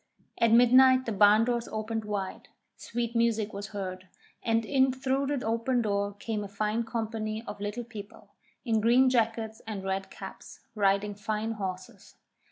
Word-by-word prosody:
At 230 -1 +4
midnight 255 +2 +6
the 230 - -2
barn 210 +2 +5
doors 240 -1 -1
opened 220 0 -3
wide, 200 -2 -4 0.3
sweet 235 0 -4
music 225 -2 +1
was 200 +1 -5
heard, 185 -3 -6 0.3
and 225 0 +1
in 265 +1 +3
through 265 +1 -1
the 280 -4 -2
open 230 +2 +1
door 200 -1 -1
came 210 0 -3
a - - -6
fine 210 +3 -1
company 220 -1 -3
of 205 -1 -8
Little 210 +4 -3
People, 220 -1 -11 0.4
in 225 -3 +2
green 250 +4 +5
jackets 225 -2 0
and 205 -3 -5
red 195 0 -2
caps, - - -10
riding 200 -1 +1
fine 215 +2 -3
horses. 190 -4 -7
220 Hz, 160 wpm, -29 LUFS, 205-235 Hz, 0.4 s, midnight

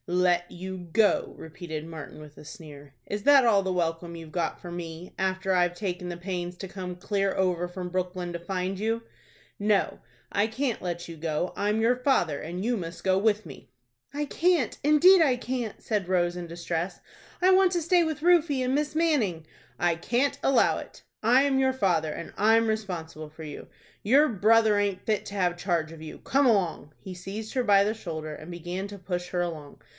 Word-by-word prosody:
"Let 175 0 +1
you 185 +1 -6
go!" 215 +3 +2
repeated 160 -1 -7
Martin, 160 -2 -9
with 150 -1 -12
a - - -11
sneer. 145 -5 -12
"Is 205 0 -4
that 280 -1 +6
all 210 -4 +5
the 190 -1 -2
welcome 170 -1 -2
you've 165 -2 -10
got 170 -1 -2
for 175 - -9
me, 170 0 -7
after 190 0 0
I've 175 -1 +2
taken 180 -2 -4
the 175 - -5
pains 175 -1 -4
to 190 - -6
come 180 -1 -6
clear 195 +1 -1
over 180 -2 0
from 180 0 -6
Brooklyn 180 -1 -3
to 170 - -4
find 185 +2 -3
you? 225 +2 -1 0.6
No, 205 -1 +1 0.3
I 205 +2 +2
can't 245 +1 -2
let 175 -1 -4
you 165 - -8
go; 160 +2 -2
I'm 210 +2 0
your 235 +2 +3
father, 250 - +1
and 175 +5 -5
you 245 +1 +1
must 170 -3 -7
go 190 0 +3
with 210 0 +1
me." 135 -6 -12 0.4
"I 295 +1 -2
can't, 330 -3 +1
indeed 330 +6 +7
I 275 -6 +4
can't," 245 -3 -4
said 205 -5 -1
Rose, 175 -1 +1
in 175 -1 -6
distress 170 +1 -4 0.4
"I 370 +1 +5
want 375 -1 +5
to 345 - +1
stay 345 +2 +3
with 315 -2 -3
Rufie 330 -6 +4
and 255 - 0
Miss 295 +1 -1
Manning." 245 - +1 0.3
"I 175 -1 +2
can't 245 - 0
allow 270 - +3
it. - - -12 0.2
I'm 265 +4 +4
your 265 0 +3
father, 175 -10 +1
and 170 - -7
I'm 225 +2 +4
responsible 170 -8 -4
for 160 +1 -11
you. 150 -2 -8 0.4
Your 275 +8 +5
brother 220 -1 +4
aint 200 -2 -1
fit 215 -2 0
to 200 - -7
have 180 -3 +1
charge 170 -4 -1
of 160 - -12
you. 155 -1 -8
Come 275 +1 +2
along." 180 -9 +1
He 190 - -8
seized 195 +5 -7
her 255 -2 +1
by 200 -3 +5
the 215 - 0
shoulder, 160 -7 -6
and 155 +3 -9
began 175 +3 -5
to 200 0 -9
push 180 -1 -4
her 180 0 -1
along. 155 -5 -5
185 Hz, 200 wpm, -27 LUFS, 175-225 Hz, 0.6 s, indeed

